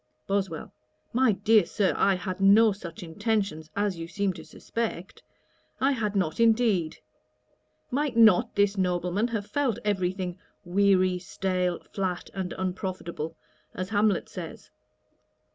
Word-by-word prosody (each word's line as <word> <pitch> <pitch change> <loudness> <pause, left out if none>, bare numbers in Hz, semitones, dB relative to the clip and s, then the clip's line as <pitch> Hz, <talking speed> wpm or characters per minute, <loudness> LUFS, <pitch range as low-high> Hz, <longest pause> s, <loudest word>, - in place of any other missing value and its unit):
BOSWELL. 195 -5 -2 0.4
'My 255 0 +4
dear 210 +2 +4
Sir, 190 +2 0
I 195 -1 +3
had 185 +1 -5
no 210 +3 +6
such 180 -4 -8
intentions 195 -3 -2
as 200 -4 -1
you 165 - -5
seem 195 +3 -1
to 165 -2 -10
suspect; 220 -5 -5 0.6
I 270 +2 +3
had 215 -6 -1
not 180 -3 0
indeed. 220 -8 +3 0.9
Might 275 -2 -1
not 220 -6 +5
this 205 0 +2
nobleman 180 +3 0
have 220 -4 -3
felt 270 -2 0
every 190 -4 +1
thing 185 -1 -5 0.3
"weary, 185 0 +3
stale, 180 -1 -2
flat, 185 -3 -3
and 190 -2 -4
unprofitable," 180 -4 -4 0.4
as 185 +1 -4
Hamlet 210 -1 +2
says?' - - -9
195 Hz, 130 wpm, -27 LUFS, 180-210 Hz, 0.9 s, no